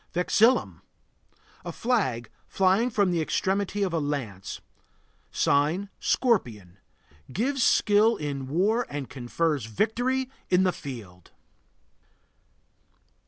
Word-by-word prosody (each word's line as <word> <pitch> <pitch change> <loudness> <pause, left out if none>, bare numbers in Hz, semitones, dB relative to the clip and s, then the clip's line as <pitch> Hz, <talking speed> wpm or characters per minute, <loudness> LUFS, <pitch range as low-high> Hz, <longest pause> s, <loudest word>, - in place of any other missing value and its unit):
VEXILLUM. 220 +8 +2 0.8
A - - -5
flag 185 - -1 0.2
flying 195 +6 +2
from 205 -5 +1
the 170 -2 0
extremity 195 +5 -1
of 185 -3 -1
a 165 - +1
lance. 130 -11 -4 0.7
Sign: 155 +8 +1
Scorpion. 110 - 0 0.5
Gives 260 - -1
skill 215 0 +4
in 140 -3 -4
war 205 - +1
and 145 -2 -6
confers 140 +1 -1
victory 245 - -1 0.2
in 180 +1 +4
the 185 - +3
field. 105 - -9
180 Hz, 100 wpm, -26 LUFS, 135-220 Hz, 0.8 s, skill